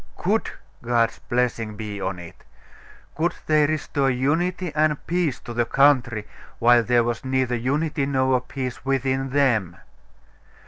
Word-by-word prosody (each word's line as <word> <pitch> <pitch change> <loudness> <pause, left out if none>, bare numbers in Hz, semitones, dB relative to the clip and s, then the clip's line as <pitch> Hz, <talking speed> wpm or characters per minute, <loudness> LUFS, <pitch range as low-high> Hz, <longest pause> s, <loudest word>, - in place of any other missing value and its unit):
Could - - 0 0.3
God's 115 -1 +1
blessing 120 -3 -1
be 105 -1 -6
on 95 -1 -2
it? 85 -1 -12 0.7
Could 165 +3 0
they 155 -1 +3
restore 145 -3 0
unity 165 +7 0
and 155 -1 +2
peace 170 -6 0
to 120 - -8
the 120 0 +1
country 125 -6 +3 0.3
while 120 0 +5
there 120 +1 +2
was 120 0 -3
neither 130 -1 0
unity 140 +4 -1
nor 130 -2 +2
peace 125 -1 -6
within 135 0 0
them? 120 -11 +1
130 Hz, 135 wpm, -23 LUFS, 120-145 Hz, 0.7 s, while